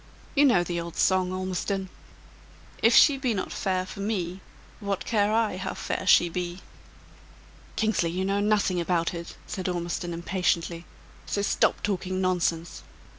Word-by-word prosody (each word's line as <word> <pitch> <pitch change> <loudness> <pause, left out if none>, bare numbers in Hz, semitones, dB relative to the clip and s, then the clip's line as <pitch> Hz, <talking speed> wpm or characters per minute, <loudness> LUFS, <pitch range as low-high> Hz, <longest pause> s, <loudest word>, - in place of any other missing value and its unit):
You 290 0 +5
know 195 -10 +4
the 175 -1 -3
old 170 0 -7
song, 185 -1 +2
Ormiston: 185 +1 -2 0.9
'If 230 +2 +5
she 285 -3 +7
be 250 -4 0
not 190 - -3
fair 185 -1 -1
for 185 - -9
me 190 -3 -2 0.4
What 200 -3 -3
care 210 -2 +2
I 220 -4 +1
how 185 - -4
fair 190 - -3
she 175 - +6
be!'" 175 +1 -4 1.1
"Kingsley, 215 -6 +1
you 185 +3 -2
know 200 +1 +1
nothing 205 -4 +2
about 170 -1 0
it!" 170 0 -7
said 185 -1 -4
Ormiston, 175 0 -3
impatiently. 170 -1 -1 0.4
"So 200 - -1
stop - - +1
talking 185 -2 -1
nonsense. 170 -2 -1
185 Hz, 150 wpm, -26 LUFS, 175-200 Hz, 1.1 s, she